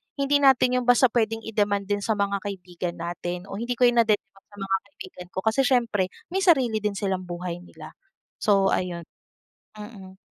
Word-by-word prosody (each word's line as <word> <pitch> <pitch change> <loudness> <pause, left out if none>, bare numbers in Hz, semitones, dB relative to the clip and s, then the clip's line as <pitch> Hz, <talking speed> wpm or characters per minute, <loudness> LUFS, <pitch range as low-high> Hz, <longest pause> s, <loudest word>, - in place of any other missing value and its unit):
hindi 280 0 +2
natin 255 -2 +4
'yon 245 - -5
basta 245 -1 +5
pwedeng 225 -1 0
i-demand 205 -2 0
din 205 0 +1
sa 215 +2 -1
mga 200 -1 0
kaibigan 180 -3 -5
natin. 175 +1 -5
O 195 - -5
hindi 245 +1 -2
ko 250 - 0
'yon 240 -1 +5
nadedemand 215 -2 0
sa 205 - -18
mga 195 0 +1
kaibigan 185 -2 -11
ko, - - 0
kasi 220 +5 +2
siyempre 230 -7 +1 0.2
may 380 - 0
sarili 260 - +4
din 210 -1 -2
silang 190 -2 -2
buhay 175 0 -5
nila. 180 - -12 0.5
So 195 -2 +3
ayon. 175 -2 -2 0.7
Mm. 200 -3 -11
205 Hz, 180 wpm, -25 LUFS, 185-235 Hz, 0.7 s, basta